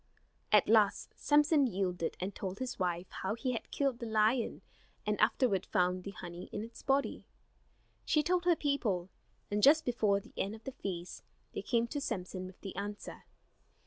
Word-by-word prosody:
At 210 - +6
last 215 -2 +3
Samson 295 -1 +4
yielded, 180 -5 -2
and 190 +2 -3
told 190 0 -5
his 255 -3 -4
wife 175 -1 0 0.2
how 190 +3 -1
he 255 +2 -1
had 235 - -4
killed 275 -4 0
the 235 - -4
lion 220 +2 +1 0.4
and - - 0
afterward 205 -9 +3
found 180 0 +1
the - - -4
honey 175 -2 -8
in 210 - -3
its 230 +1 -10
body. 275 +1 0 0.8
She 305 -1 +2
told 355 +1 +1
her 350 -1 +5
people, 215 - -1 0.4
and 205 0 +1
just 310 +6 +6
before 215 -5 +2
the - - -17
end 200 +3 -2
of 220 - -14
the 270 - -5
feast 180 -7 -5 0.3
they - - -3
came 235 -1 +1
to 290 - -3
Samson 185 -7 -4
with 185 - -13
the 195 - -7
answer. 205 +1 -6
210 Hz, 175 wpm, -33 LUFS, 185-260 Hz, 0.8 s, At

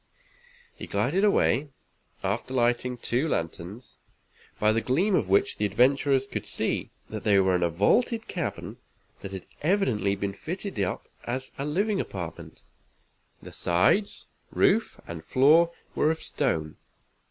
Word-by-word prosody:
He - - -8
glided 195 +2 +1
away, 150 - +3 0.5
after 110 +7 -2
lighting 120 0 +1
two 125 +5 0
lanterns, 90 - -4 0.6
by 105 0 +4
the 115 +1 +1
gleams 175 - +2
of 95 - -1
which 100 - +2
the 105 - 0
adventurers 135 +5 +3
could - - -5
see - - -1 0.2
that - - -5
they 100 -2 +4
were 95 -1 +3
in 90 - 0
a 85 - +2
vaulted 220 - +2
cavern 175 -3 -4 0.4
that 100 - -7
had 95 -2 -7 0.2
evidently 135 - +1
been 100 0 -3
fitted 185 - -5
up 95 -2 -2 0.2
as 130 +2 -4
a 140 - -1
living 195 +6 0
apartment. 85 -4 -7 0.8
The - - -9
sides, 90 - +1 0.2
roof 225 - +2
and 80 -2 -7
floor 160 +6 +5 0.2
were 150 - +2
of 160 0 -2
stone. 80 - -1
125 Hz, 140 wpm, -27 LUFS, 100-160 Hz, 0.8 s, floor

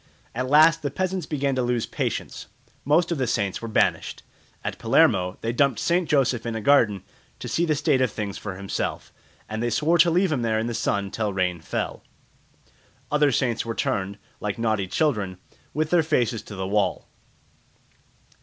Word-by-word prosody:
At 130 +2 -2
last 160 +3 +6
the 145 - -2
peasants 185 +2 -2
began 140 -2 -1
to 130 - 0
lose 120 -2 0
patience. - - -4 0.4
Most 160 +5 +2
of 165 - -1
the 130 - 0
saints 100 -4 -1
were 115 - -5
banished. 110 - 0 0.4
At - - -4
Palermo 90 0 +3
they 115 +1 -2
dumped 135 -1 +2
St. 170 -1 +1
Joseph 125 -5 +2
in 115 -1 -3
a - - -2
garden 110 -5 +3 0.3
to - - -7
see 170 - +1
the 155 - +2
state 140 -2 +2
of 130 - +3
things 105 -2 -4
for 95 -3 -6
himself, 100 0 -4 0.3
and 110 +1 -4
they 120 - 0
swore 160 +8 +2
to 170 +2 +6
leave 180 +1 +2
him 140 -5 0
there 110 -1 +1
in 110 - -1
the 120 - -3
sun 100 -3 -1
till 110 -2 -1
rain 90 -2 0
fell. - - -4 1.1
Other 150 -1 +3
saints 120 -2 0
were 115 0 -4
turned, 100 0 -1 0.2
like 105 -1 -3
naughty 110 -4 0
children, 100 - 0 0.3
with 155 +1 -1
their 175 -1 +5
faces 120 -7 0
to 105 - -9
the 95 0 -3
wall. 100 -1 0
120 Hz, 185 wpm, -24 LUFS, 105-150 Hz, 1.1 s, last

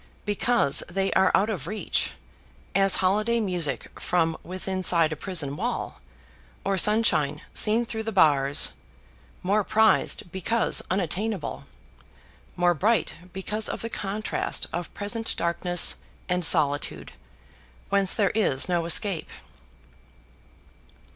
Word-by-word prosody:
because 205 - +1
they 195 +2 -1
are 190 0 +4
out 200 - +2
of 180 -9 -4
reach; 210 -2 -1 0.6
as 195 0 +4
holiday 215 +5 +2
music 180 -8 -1
from 165 -2 0
withinside 185 -3 0
a - - -5
prison 150 -5 -2
wall - - -4 0.6
or 195 - +1
sunshine 215 +4 +3
seen 225 +3 +2
through 225 -1 -5
the 225 0 -4
bars; 145 -7 +3 0.7
more 205 +3 +2
prized 215 -3 +2
because 215 +5 +1
unattainable 190 +2 -3 0.9
more 175 0 +3
bright 215 +8 +1 0.2
because 210 +4 -2
of - - -5
the 230 - -5
contrast 205 +2 -2
of 175 0 -4
present 225 +2 -3
darkness 170 +1 +2 0.3
and 180 -1 0
solitude, 145 - +1 0.8
whence 195 -2 +2
there 200 -4 +2
is 185 -12 +1
no 175 -2 0
escape. 175 +1 +1
190 Hz, 115 wpm, -25 LUFS, 170-215 Hz, 0.9 s, are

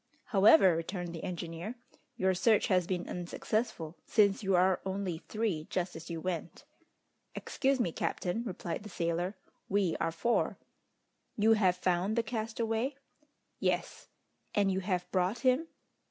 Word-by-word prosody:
"However," 200 - +7
returned 175 +1 -4
the 165 - -7
engineer, 175 +5 -5 0.4
"your 190 0 +2
search 210 +4 +3
has 180 -3 +3
been 180 -2 -2
unsuccessful, 175 -2 -3
since 200 -3 +3
you 195 -2 +2
are 185 +1 +3
only 190 -3 -3
three 205 -8 -2
just 180 -1 -2
as 160 0 -8
you 165 -1 -3
went!" 175 - -4 0.7
"Excuse 270 0 0
me, 180 -8 +1
captain," 180 +7 -2
replied 185 -5 -4
the 210 - -9
sailor, 175 +2 -1 0.3
"we 195 -4 +2
are 165 - 0
four." 235 +9 0 0.8
"You 220 +1 +5
have 190 -5 +3
found 180 +3 +1
the 235 - +2
castaway?" 225 +3 -2 0.6
"Yes." - - -1 0.5
"And 200 -2 +3
you 190 - 0
have 180 -2 -1
brought 185 +4 +1
him?" 260 +6 +3
190 Hz, 140 wpm, -32 LUFS, 175-220 Hz, 0.8 s, However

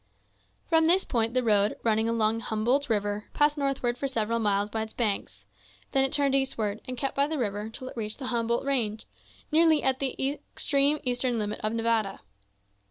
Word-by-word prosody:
From 325 -1 +3
this 360 +4 +4
point 230 -1 0
the 255 - +3
road, 210 -2 +3
running 220 0 +2
along 225 -1 +1
Humboldt 235 +6 0
River, 205 -1 -1
passed 295 0 +3
northward 270 -4 -1
for 275 - -1
several 230 -3 -1
miles 205 -2 +1
by 220 +1 -3
its 220 0 -6
banks; 215 -5 -2 0.5
then 270 -1 +3
it 270 - 0
turned 280 -2 +2
eastward, 225 -6 -1
and 255 0 -4
kept 270 +3 -2
by 280 +1 +2
the 315 0 -3
river 205 -5 -1
until 225 +5 -6
it - - -8
reached 215 -2 -4
the 270 - -6
Humboldt 235 +2 0
Range, 230 -6 -1 0.5
nearly 315 -1 +4
at 265 -1 +2
the 275 +1 -1 0.2
extreme 285 +1 +2
eastern 245 -1 0
limit 210 -1 -2
of 215 +1 -2
Nevada. 225 -3 0
235 Hz, 185 wpm, -27 LUFS, 215-275 Hz, 0.5 s, this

